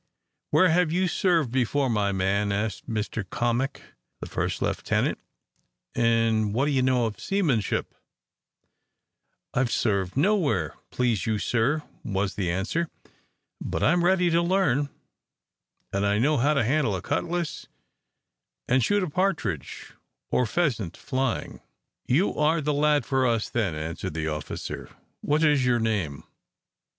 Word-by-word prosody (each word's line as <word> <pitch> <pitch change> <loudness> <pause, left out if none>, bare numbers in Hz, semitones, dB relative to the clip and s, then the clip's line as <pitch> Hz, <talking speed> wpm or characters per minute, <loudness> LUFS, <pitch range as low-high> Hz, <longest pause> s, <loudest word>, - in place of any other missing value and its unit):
"Where 185 - +5
have 170 -1 +3
you 185 +2 +2
served 170 -8 +1
before, 130 +2 +1
my 105 -4 +1
man?" 100 +2 0
asked 100 +2 -3
Mr 110 -1 -2
Cammock, 120 +4 -1 0.4
the - - -6
first - - -2
lieutenant; - - 0 0.7
"and 115 -2 +2
what 135 +4 +2
do 150 - +1
you 135 -2 +2
know 130 -2 +2
of 110 -2 -4
seamanship?" 155 - 0 1.6
"I - - +1
have 125 -2 +1
served 100 -2 0
nowhere, 145 - +2 0.2
please 120 -4 0
you, 110 -1 +1
sir," 125 +8 0 0.2
was 100 -1 -1
the 95 -4 -2
answer, 105 - -1 0.7
"but - - -2
I - - +5
am 175 0 +2
ready 180 -1 +3
to 170 +1 +3
learn. 170 -6 +1 1.0
And 100 +1 0
I 100 0 +2
know 145 +7 +2
how 145 +5 +2
to 140 - +3
handle 130 -3 +1
a 95 - -4
cutlass, 175 -2 -2 1.0
and 125 0 +3
shoot 205 - +2
a - - -1
partridge 145 - -2 0.4
or 125 - +2
pheasant 115 - -1
flying." 130 -2 -2 0.5
"You 160 +11 +2
are 155 +2 +2
the 150 0 0
lad 145 -2 +2
for 130 -1 +2
us 115 -2 0
then," 105 -9 0
answered 80 0 -5
the 80 -1 -2
officer. 75 -1 -5 0.3
"What 150 +2 +1
is 145 -4 +4
your 125 -1 +3
name? 100 -11 -1
125 Hz, 145 wpm, -26 LUFS, 105-155 Hz, 1.6 s, Where